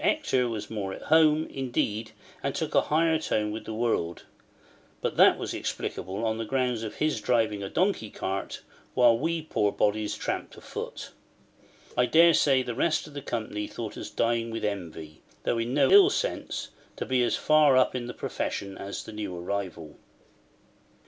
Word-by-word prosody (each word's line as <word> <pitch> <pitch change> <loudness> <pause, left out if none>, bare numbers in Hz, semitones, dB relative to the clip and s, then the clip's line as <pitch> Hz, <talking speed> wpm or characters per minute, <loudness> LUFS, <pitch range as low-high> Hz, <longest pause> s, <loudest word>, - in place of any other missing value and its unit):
Hector 125 -2 +2
was 105 -2 -4
more 100 -3 -4
at - - -9
home, 155 -1 +5
indeed, 115 -4 -2 0.3
and - - -2
took - - -2
a - - +5
higher 160 +1 +3
tone 105 -8 -1
with 110 - -6
the 110 - -5
world; 110 -7 -1 0.8
but - - -2
that - - +7
was - - -4
explicable 95 +5 -4
on 110 0 -1
the - - -1
ground 125 -1 -1
of 110 - -5
his 150 -8 0
driving 110 -4 +1
a 100 - -4
donkey 185 - 0
cart, 95 -1 -4 0.3
while 120 -2 +6
we 160 +5 -1
poor 105 -9 +1
bodies 105 0 0
tramped - - -4
afoot. - - -7 0.8
I 125 - +3
daresay, 155 -5 +5
the 120 - -4
rest 155 +6 +1
of 150 - -12
the 145 - -5
company 110 -4 -3
thought 115 -3 -6
us - - -6
dying 115 0 0
with 115 -1 -3
envy, 80 -6 -5 0.2
though 115 - 0
in 115 +1 -2
no 145 - +4
ill 395 -1 +8
sense, - - -2 0.3
to - - -4
be 130 -1 +1
as - - +1
far 150 -3 +5
up 130 - +4
in 125 -2 -3
the 125 - -7
profession 100 -1 -4
as 100 0 -5
the 110 - -10
new 105 -4 -5
arrival. 85 -4 -5
115 Hz, 175 wpm, -27 LUFS, 105-135 Hz, 0.8 s, ill